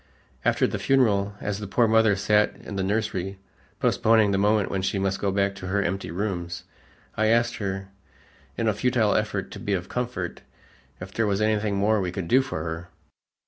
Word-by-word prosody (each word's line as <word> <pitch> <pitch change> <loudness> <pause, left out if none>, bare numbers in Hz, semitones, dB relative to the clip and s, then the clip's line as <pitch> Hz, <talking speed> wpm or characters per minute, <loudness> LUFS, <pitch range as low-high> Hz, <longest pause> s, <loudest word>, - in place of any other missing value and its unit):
After - - +3
the - - -2
funeral, 100 -7 +2
as 100 0 -2
the 105 - -5
poor 115 +4 +3
mother 110 -2 +4
sat 105 +2 +2
in 100 - -9
the 95 - -1
nursery 100 -1 -1 0.4
postponing 110 -2 +3
the 95 - +1
moment 105 0 +2
when 95 - -1
she 95 +1 -1
must 95 0 0
go 100 - +1
back 100 0 +1
to 90 -2 -8
her 100 +2 +1
empty 95 +2 -2
rooms, 90 -1 -3 0.5
I 110 - +2
asked 115 +1 +2
her, 95 -2 -4 0.7
in 115 - 0
a 110 - +3
futile 115 -1 +2
effort 105 -2 -1
to - - -8
be 100 - -2
of 90 -1 -2
comfort, 120 -8 -3 0.6
if 95 +2 -9
there 115 -1 +1
was 100 -1 +1
anything 110 -1 +1
more 105 +1 +2
we 90 -1 -2
could 90 -2 -4
do 130 +9 +5
for 130 -12 -4
her. 80 +1 -5
100 Hz, 195 wpm, -25 LUFS, 95-110 Hz, 0.7 s, do